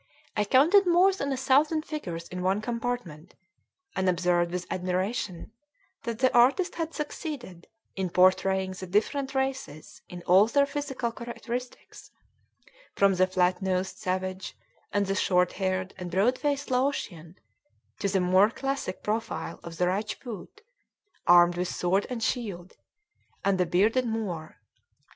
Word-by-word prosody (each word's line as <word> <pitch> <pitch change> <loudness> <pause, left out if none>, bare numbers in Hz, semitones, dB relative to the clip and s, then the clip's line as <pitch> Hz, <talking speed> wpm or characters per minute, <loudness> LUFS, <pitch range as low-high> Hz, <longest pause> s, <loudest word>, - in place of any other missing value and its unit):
I 210 - +1
counted 335 - +5
more 360 +3 +5
than 280 -7 -3
a 265 - -1
thousand 295 +4 +2
figures 175 - -5
in 180 0 -5
one 190 +2 +1
compartment, 230 -8 -4 0.6
and 185 0 +1
observed 175 -1 +2
with 180 0 -3
admiration 185 +1 -2 0.5
that 230 -2 -3
the 260 +1 +2
artist 270 +10 +4
had 325 -1 -4
succeeded 280 - -6 0.3
in 190 -2 -2
portraying 190 +1 +3
the 185 0 -7
different 270 +8 0
races 265 - -3
in 175 -1 -9
all 190 +4 +5
their 280 +4 +3
physical 280 -4 -3
characteristics, 240 +1 -7 0.9
from 200 -1 +4
the 185 0 +3
flat 180 0 +1
nosed 190 0 -1
savage, 185 0 -3 0.3
and 205 0 +1
the 195 - -1
short 180 -2 +2
haired 185 -1 -2
and 180 -1 -5
broad 205 +9 +2
faced 285 -2 -1
Laotian, 220 - -1 0.6
to 200 - 0
the 190 0 +1
more 185 +3 +4
classic 270 -6 -4
profile 225 +2 -3
of 165 -1 -9
the 180 - +2
Rajpoot, 210 - -4 0.7
armed 175 0 +7
with 180 +1 -1
sword 185 +3 0
and 240 -3 -4
shield, 200 -8 -3 0.7
and 195 -1 +2
the 180 - +2
bearded 220 +9 +2
Moor. 195 -8 -4
200 Hz, 140 wpm, -27 LUFS, 180-255 Hz, 0.9 s, armed